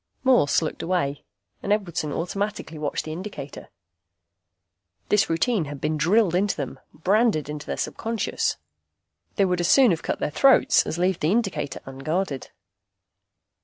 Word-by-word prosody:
Morse 245 - +4
looked 155 - -4
away, 155 -6 -1 0.4
and 200 - -3
Edwardson 175 -7 -1
automatically 180 0 -3
watched 145 -1 -2
the 155 - -5
indicator. 175 -6 -8 1.4
This 210 -1 +3
routine 170 +3 +1
had 145 -1 -7
been 155 +2 -1
drilled 175 +5 +3
into 195 +3 +1
them, 135 -2 -5
branded 195 -1 +1
into 150 0 -6
their - - -3
subconscious. 225 -1 -2 0.8
They 195 - +3
would 180 -1 0
as 175 - +1
soon 250 +3 +6
have 165 - -1
cut - - -2
their - - -2
throats 270 - +4
as 160 - -3
leave 180 0 +1
the 155 - +1
indicator 190 - -1
unguarded. 140 +3 -3
175 Hz, 145 wpm, -24 LUFS, 150-205 Hz, 1.4 s, soon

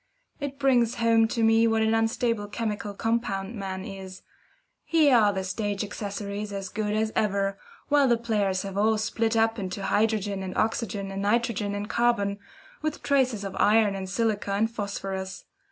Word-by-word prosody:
It 280 -1 -4
brings 250 -4 +3
home 230 -1 +4
to 230 0 -1
me 225 +1 +5
what 225 0 +2
an 220 0 +2
unstable 225 -1 0
chemical 210 -1 -3
compound 225 -2 -1
man 190 -3 -5
is. 190 -1 -9 0.6
Here 305 -5 +4
are 210 -3 +5
the 190 -1 -3
stage 205 +1 -2
accessories 205 0 -5
as 195 -1 -4
good 210 +1 -2
as 220 0 0
ever, 200 -1 0 0.3
while 290 -2 +4
the 240 -2 +4
players 205 -5 0
have 195 0 -4
all 220 +1 +3
split 225 +1 0
up 225 0 +2
into 190 0 -4
hydrogen 205 -1 +1
and 185 -1 -5
oxygen 205 -3 -1
and 195 0 -4
nitrogen 210 -1 0
and 205 +1 -4
carbon, 215 -3 +1 0.4
with 310 -1 -3
traces 255 -7 +1
of 195 -1 -5
iron 210 -1 +4
and 190 -1 -5
silica 205 0 0
and 220 +3 +1
phosphorus. 195 -3 -5
210 Hz, 170 wpm, -26 LUFS, 200-230 Hz, 0.6 s, me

